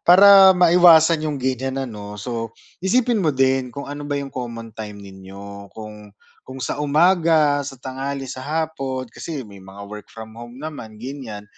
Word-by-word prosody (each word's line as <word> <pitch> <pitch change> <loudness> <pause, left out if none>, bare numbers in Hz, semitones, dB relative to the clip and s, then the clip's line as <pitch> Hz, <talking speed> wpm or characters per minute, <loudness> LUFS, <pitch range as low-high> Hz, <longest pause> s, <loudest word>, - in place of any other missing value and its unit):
para 195 +1 +9
maiwasan 170 -2 +6
yung 145 - -3
ganiyan 130 +1 -2
ano, 105 -3 -8
so 115 +1 -4 0.3
isipin 230 +3 +1
mo 165 - +1
din 130 -2 +1
kung 140 +3 -8
ano 145 +1 -7
ba 145 - -1
yung 140 -1 -5
common 115 -3 -7
time 105 -1 -8
ninyo 100 +1 -11
kung 105 -1 -11 0.3
kung 130 +1 -10
sa 145 - -4
umaga, 155 -1 +3
sa 135 -1 -7
tanghali, 135 +2 -5
sa 130 0 -7
hapon. 140 -4 -3
Kasi 150 -6 -6
may 100 -2 -14
mga 100 +1 -11
work 105 0 -10
from 110 -1 -10
home 120 +1 -11
naman, 140 -8 -8
ganiyan. 120 -5 -8
130 Hz, 165 wpm, -21 LUFS, 110-155 Hz, 0.3 s, para